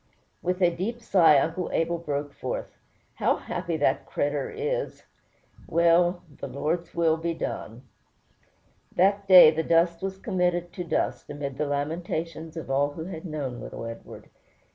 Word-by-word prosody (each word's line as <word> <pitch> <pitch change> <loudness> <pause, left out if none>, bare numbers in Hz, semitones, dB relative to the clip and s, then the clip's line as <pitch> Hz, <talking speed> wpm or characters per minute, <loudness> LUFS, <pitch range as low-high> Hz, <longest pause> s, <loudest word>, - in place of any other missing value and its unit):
With 180 +1 -1
a 175 - +5
deep 220 +7 -3
sigh 180 -9 +5
Uncle 165 +5 0
Abel 170 +1 0
broke 145 -3 -3
forth, - - -5 0.4
"How - - +1
happy 170 -2 -4
that 140 -3 +1
cretur' 145 -1 -1
is! 475 +3 -3 0.6
Well, 170 +1 +3 0.2
the - - -5
Lord's 155 +6 -3
will 165 -1 +3
be 165 +1 -2
done." 120 -6 -5 1.1
That 200 +2 +2
day 180 -4 +10
the 160 0 -1
dust 165 +1 +2
was 190 0 -4
committed 180 -4 -1
to 180 - -4
dust, 170 - -2
amid 140 -2 -5
the 150 - 0
lamentations 160 +2 -3
of 155 -4 -5
all 145 +2 +1
who 160 - -6
had 170 -2 -7
known 140 -7 -4
little - - -7
Edward. 115 0 -10
165 Hz, 150 wpm, -26 LUFS, 145-180 Hz, 1.1 s, day